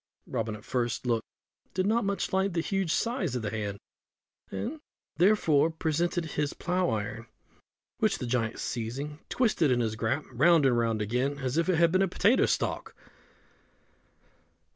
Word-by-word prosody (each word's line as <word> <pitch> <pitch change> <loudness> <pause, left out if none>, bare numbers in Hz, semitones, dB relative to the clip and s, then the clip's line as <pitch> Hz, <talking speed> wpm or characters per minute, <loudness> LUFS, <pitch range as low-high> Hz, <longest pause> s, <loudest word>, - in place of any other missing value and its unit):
Robin 115 -3 -3
at 105 - -12
the - - -19
first 120 -1 -1
look 115 -2 +1 0.5
did 185 - +1
not 225 +3 +2
much 200 -1 -2
like 190 0 +1
the 170 - +1
huge 195 -2 -1
size 210 - 0
of 120 - -2
the 105 - -2
hand, 105 -2 -3 0.7
and, 300 +7 -4 0.4
therefore, 165 -5 +4
presented 165 +2 -1
his 150 -2 -2
plough 180 0 0
iron, 110 +1 -3 0.7
which - - +2
the - - -4
giant 120 -2 -1
seizing, 135 +6 -4
twisted 215 - +2
in 125 -1 +2
his 110 -2 0
grasp 120 +7 -1
round 160 +3 +4
and 130 -2 +4
round 115 -2 +1
again 125 +6 -1
as 130 -1 -2
if 165 +3 +1
it 185 - +4
had 165 0 +4
been 185 +2 +3
a 195 - +3
potato 205 +7 +3
stalk. - - -2
145 Hz, 165 wpm, -29 LUFS, 120-180 Hz, 0.7 s, therefore